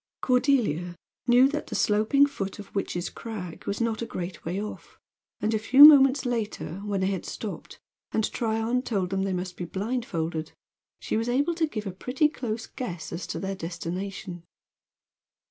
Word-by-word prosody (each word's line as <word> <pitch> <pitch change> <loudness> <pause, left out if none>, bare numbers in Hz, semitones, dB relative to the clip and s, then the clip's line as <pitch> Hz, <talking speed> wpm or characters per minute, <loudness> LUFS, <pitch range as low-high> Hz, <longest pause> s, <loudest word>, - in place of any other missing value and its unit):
Cordelia 245 - +1 0.3
knew 245 +2 +7
that 300 +1 -3
the - - -5
sloping 220 +7 +4
foot 195 -9 -5
of 205 -1 -11
Witch's 175 -3 -2
Crag 195 -7 -7
was 200 - -2
not 230 -1 -1
a 230 - -3
great 175 -4 -6
way 175 +4 -2
off, 210 +1 -7 0.4
and 215 +1 0
a 220 - +1
few 265 +6 +9
moments 280 -2 +7
later, 220 -8 -3
when 200 -2 -1
they 190 +1 +1
had 190 - -3
stopped, - - -7 0.3
and 220 - +1
Tryon 225 +2 0
told 195 -7 -2
them 195 0 0
they 195 0 -1
must 180 0 -4
be 175 - -4
blindfolded, 175 -6 -3 0.5
she - - -2
was 230 +2 -1
able 285 +7 +2
to 325 -1 +1
give 215 -7 -5
a 195 - -3
pretty 250 - +1
close 230 -6 -4
guess 180 - -6
as 170 - -5
to - - -4
their 195 0 -3
destination. 180 +1 -5
210 Hz, 175 wpm, -27 LUFS, 185-250 Hz, 0.5 s, few